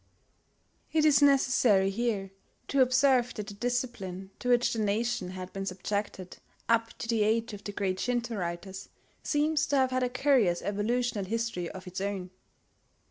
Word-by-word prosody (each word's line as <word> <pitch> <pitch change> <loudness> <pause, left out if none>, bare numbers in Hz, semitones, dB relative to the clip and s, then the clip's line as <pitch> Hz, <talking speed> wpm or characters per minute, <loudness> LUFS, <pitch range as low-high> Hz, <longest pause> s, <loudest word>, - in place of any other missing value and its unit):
It 310 -1 +3
is 295 -2 +5
necessary 250 -8 +4
here 205 -3 -2 0.4
to 275 - +3
observe 255 -1 +3
that 210 - -4
the 205 - -8
discipline 200 -5 -3
to 250 - -3
which 245 0 +3
the 230 - -3
nation 215 -1 0
had 185 0 -7
been 195 0 -4
subjected 190 0 -4 0.3
up 230 0 +1
to - - -6
the 230 -2 +1
age 225 +1 +1
of 205 - -9
the 205 - -5
great 190 -2 -2
Shinto 240 -2 -1
writers, 190 +1 -5 0.3
seems 300 0 +1
to 285 - 0
have 260 -1 +3
had 255 0 0
a 250 - +1
curious 250 -9 +2
evolutional 215 +1 -1
history 225 -4 -2
of 190 - -9
its 185 +1 -6
own. 195 -2 -3
225 Hz, 165 wpm, -29 LUFS, 195-250 Hz, 0.4 s, is